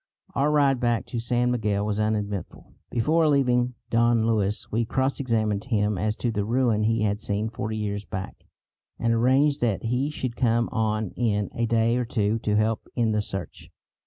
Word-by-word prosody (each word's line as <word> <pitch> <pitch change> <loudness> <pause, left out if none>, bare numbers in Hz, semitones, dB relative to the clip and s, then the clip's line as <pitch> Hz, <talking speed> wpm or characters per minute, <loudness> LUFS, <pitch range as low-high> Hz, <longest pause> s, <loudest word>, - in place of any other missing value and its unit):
Our 140 +2 +2
ride 140 -3 +3
back 120 -4 0
to 120 - -1
San 120 +1 +1
Miguel 105 -4 0
was 105 0 -1
uneventful. 105 -3 -3 0.2
Before 155 +7 +2
leaving 125 -4 +2 0.2
Don 115 -1 +3
Luis 105 -2 0
we 115 +2 +1
cross 130 +4 -1
examined 110 -5 0
him 105 -4 +1
as 105 +3 0
to 120 - -1
the 105 -2 -1
ruin 115 -1 +1
he 110 +1 +1
had 105 0 0
seen 105 +2 -2
forty 110 -1 -4
years 100 -1 -3
back, 95 -2 -7 0.5
and 115 0 +1
arranged 135 +5 +3
that 110 -5 0
he 125 +5 0
should 130 -5 -4
come 120 -2 +1
on 110 -2 -1
in 105 -5 -1
a 115 0 -1
day 115 +1 +2
or 125 - 0
two 110 0 0
to 105 -1 0
help 110 +1 0
in 115 -3 +1
the 105 0 +1
search. 95 -3 -7
115 Hz, 185 wpm, -25 LUFS, 105-125 Hz, 0.5 s, ride